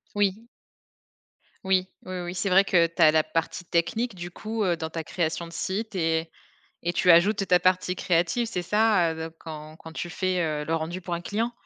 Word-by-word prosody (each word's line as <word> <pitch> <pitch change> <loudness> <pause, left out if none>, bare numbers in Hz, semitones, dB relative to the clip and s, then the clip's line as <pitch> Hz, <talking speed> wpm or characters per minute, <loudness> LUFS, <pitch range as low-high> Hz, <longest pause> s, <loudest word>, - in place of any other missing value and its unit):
Oui. 205 +3 0 1.2
Oui, 190 -1 +1 0.2
oui, 185 -1 -5
oui, 175 +1 -5
c'est 190 +2 -1
vrai 190 +2 +6
que 175 -4 +4
tu 170 +1 -5
as 155 -1 +8
la 155 0 +3
partie 165 +2 -3
technique 220 +8 0
du 175 0 -6
coup, 215 +4 -4
heu, 175 -3 +1
dans 160 0 -4
ta 165 0 -4
création 165 0 -2
de 170 - -13
site 200 +5 -3
et 160 -1 0 0.6
et 175 - 0
tu 180 +1 +3
ajoutes 195 +4 +5
ta 180 -1 +6
partie 185 0 +1
créative, 175 +7 +1
c'est 180 -6 -3
ça? 210 -3 +3
Heu, - - -8
donc 165 0 -9
quand 155 -1 -9
quand 160 0 -11
tu 175 - -4
fais, 185 0 -1 0.2
heu, - - -5
le 165 - -1
rendu 165 +3 -3
pour 175 -1 -4
un 170 - -3
client? 225 +6 -2
175 Hz, 210 wpm, -26 LUFS, 165-195 Hz, 1.2 s, as